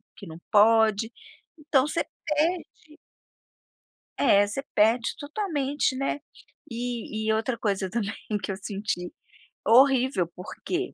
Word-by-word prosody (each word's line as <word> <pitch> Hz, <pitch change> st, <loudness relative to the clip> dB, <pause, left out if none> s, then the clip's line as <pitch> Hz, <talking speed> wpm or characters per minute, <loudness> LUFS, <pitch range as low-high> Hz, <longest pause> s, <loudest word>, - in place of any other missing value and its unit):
que 200 Hz, -, -11 dB
não 160 Hz, 0 st, -9 dB
pode!". 220 Hz, +1 st, +4 dB, 0.5 s
Então 290 Hz, -2 st, +2 dB
você 335 Hz, +2 st, -1 dB, 0.2 s
perde 310 Hz, 0 st, -2 dB, 1.2 s
É, 205 Hz, 0 st, +5 dB
você 205 Hz, +7 st, -4 dB
perde 225 Hz, +3 st, +3 dB
totalmente, 290 Hz, -5 st, -1 dB
né. 275 Hz, +2 st, -2 dB, 0.5 s
E 230 Hz, -2 st, -4 dB
e -, -, +4 dB
outra 230 Hz, +2 st, -1 dB
coisa 195 Hz, -3 st, -1 dB
também 205 Hz, -2 st, -2 dB, 0.3 s
que 195 Hz, -, -2 dB
eu -, -, -3 dB
senti 200 Hz, -3 st, -4 dB, 0.5 s
Horrível 255 Hz, -5 st, +4 dB
porque 350 Hz, -, -4 dB
230 Hz, 115 wpm, -26 LUFS, 205-280 Hz, 1.2 s, É